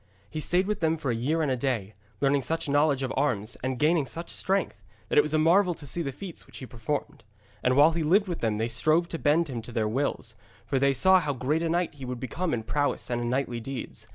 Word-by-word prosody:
He 155 - -4
stayed 180 +4 +1
with 210 +1 -2
them 160 -1 +1
for 140 -5 -2
a - - 0
year 150 +8 0
and 145 - 0
a - - +2
day, 120 -6 -2 0.3
learning 140 0 +3
such 160 +4 -1
knowledge 145 -1 +2
of 130 - -2
arms, 120 -6 0
and 130 0 -2
gaining 150 0 +2
such 170 +1 -5
strength, 195 0 -1 0.3
that - - +1
it - - +9
was 150 +1 -1
marvel 175 +4 +4
to 150 - -9
see 170 +5 -2
the 140 -4 -2
feats 180 +5 -8
which - - -11
he 130 - -7
performed. 120 +1 -4 0.4
And 125 0 +2
while 145 +4 +7
he 165 0 -2
lived 190 +7 +3
with 175 -2 -3
them 110 -2 0
they 110 +2 -1
strove 155 +9 +2
to 165 - -4
bend 160 +3 +3
him 125 -5 -4
to 120 - -10
their 110 -2 0
wills, 120 -1 -1 0.3
for 135 +2 0
they 140 +1 +3
saw 190 +5 +6
how 150 -4 -2
great 140 +5 0
a 165 - 0
knight 175 +1 0
he 135 -3 -9
would 125 -1 -5
become 165 +8 -3
in 115 -2 -1
prowess 145 +3 -1
and 120 0 0
in 120 - -1
knightly 125 -2 -1
deeds. 130 +3 -7
145 Hz, 255 wpm, -27 LUFS, 125-165 Hz, 0.4 s, it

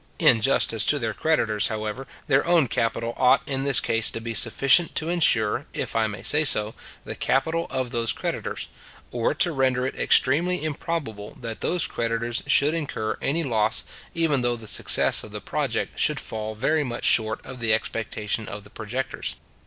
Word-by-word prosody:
In 115 - +5
justice 115 -4 +2
to 145 - +5
their 115 -5 -2
creditors, 110 -8 +1
however, 110 +4 -5 0.2
their 135 -3 +2
own 170 -5 +4
capital 115 +1 -1
ought 130 +3 +3
in 135 -1 -2
this 140 -3 +3
case 115 -1 +2
to - - -5
be 115 0 -5
sufficient 135 +9 +4
to 160 - 0
insure, 120 -11 +1
if - - -4
I 110 -1 +2
may 105 -1 -8
say 150 +1 +3
so, 105 -6 +2 0.3
the - - -5
capital 165 +5 0
of 130 -2 -3
those 115 -1 +1
creditors; - - -4 0.4
or 120 +4 -1
to 175 +3 +2
render 130 -3 +1
it 130 - -3
extremely 170 +6 +3
improbable 145 -9 -4
that 115 -2 -6
those 175 -1 +2
creditors 115 +1 -2
should 145 +2 +4
incur 135 -9 -3
any 165 +4 0
loss, 110 -4 +1 0.3
even 160 -5 +1
though 120 0 +1
the 115 -2 -11
success - - +2
of - - -10
the - - -7
project - - -3
should - - +2
fall 110 0 -4
very 150 +7 +1
much 120 -3 -5
short 110 0 +2
of 130 - -9
the 115 -2 0
expectation 110 -1 -2
of 105 0 -8
the 105 - -17
projectors. 125 +5 -4
120 Hz, 180 wpm, -24 LUFS, 110-145 Hz, 0.4 s, In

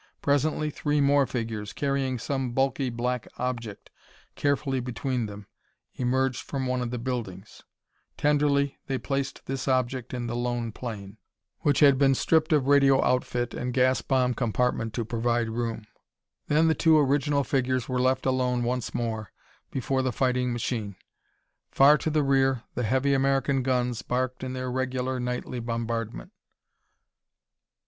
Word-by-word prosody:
Presently 150 +2 +1
three 150 0 0
more 140 -1 +4
figures, 110 -4 -4
carrying 135 -2 -1
some 130 +1 -2
bulky 135 0 +1
black 120 0 -2
object 120 -5 -4 0.4
carefully 140 -2 0
between 125 -1 -2
them, 100 0 -9 0.5
emerged 130 0 0
from 135 -2 -4
one 125 0 -1
of 120 - -2
the 125 - -3
buildings. 115 -6 -5 0.6
Tenderly 145 -1 +2
they 135 - -1
placed 135 +1 -3
this 135 0 -4
object 130 -2 0
in 125 -1 -3
the 120 0 -3
lone 120 -1 -2
plane, 105 -3 -7 0.4
which 145 0 +1
had 140 -3 +6
been 135 -1 +4
stripped 160 +3 +2
of 150 -4 +3
radio 140 -1 +5
outfit 120 -1 0
and 125 0 -3
gas 130 -2 +3
bomb 130 -2 +1
compartment 120 -1 -1
to 115 - -2
provide 120 0 0
room. 115 -1 -3 0.6
Then 155 +2 +3
the 160 - +4
two 160 0 +4
original 145 0 +2
figures 130 -2 0
were 125 -1 0
left 130 0 +1
alone 125 -2 +1
once 125 0 -2
more 110 -3 -3 0.4
before 135 0 -1
the 130 -1 0
fighting 125 0 0
machine. 115 -4 -3 0.7
Far 145 +2 +6
to - - -1
the 155 -1 +2
rear, 135 -3 +2
the 125 - -2
heavy 130 +4 +1
American 135 0 +2
guns 125 -2 0
barked 130 +2 -2
in 130 0 -4
their 130 -1 -3
regular 130 0 -2
nightly 125 0 -3
bombardment. 115 - -4
130 Hz, 150 wpm, -27 LUFS, 120-135 Hz, 0.7 s, had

